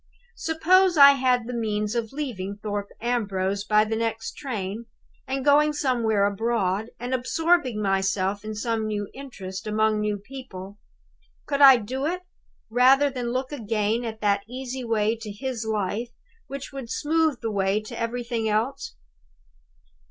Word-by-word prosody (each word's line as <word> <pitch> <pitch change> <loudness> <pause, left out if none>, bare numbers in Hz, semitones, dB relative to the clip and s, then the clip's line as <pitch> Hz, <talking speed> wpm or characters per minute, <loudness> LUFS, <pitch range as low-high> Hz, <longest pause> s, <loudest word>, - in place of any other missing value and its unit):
"Suppose 350 +3 +3
I 280 -1 +10
had 255 -3 +2
the 250 - -5
means 210 -2 -1
of 230 -2 -2
leaving 210 -9 -4
Thorpe 205 -1 -4
Ambrose 200 -5 -1
by 210 +1 +3
the 220 +1 -2
next 225 0 -2
train, 225 -4 -5 0.4
and 265 +1 -2
going 300 +1 +5
somewhere 235 -8 +1
abroad, 205 0 0
and 245 +2 -4
absorbing 260 -1 +1
myself 195 +1 0
in 215 0 -5
some 220 0 -1
new 205 -1 -3
interest, 200 -7 -8
among 215 0 +2
new 210 -1 -1
people. 205 -4 -10 0.7
Could 280 -1 -1
I 270 -2 +10
do 260 +6 -3
it, 360 +2 -3 0.5
rather 265 +4 +5
than 245 -2 -3
look 255 +2 -2
again 225 -3 -1
at 220 -2 -6
that 200 -1 +2
easy 255 0 -5
way 225 -1 +1
to 220 -2 -7
his 230 +1 -4
life 210 +3 -2 0.4
which 275 0 -7
would 265 -4 -7
smooth 310 0 +1
the 225 - -2
way 195 0 +1
to 215 - -8
everything 230 -1 -2
else? 230 - -1
230 Hz, 150 wpm, -25 LUFS, 210-265 Hz, 0.7 s, I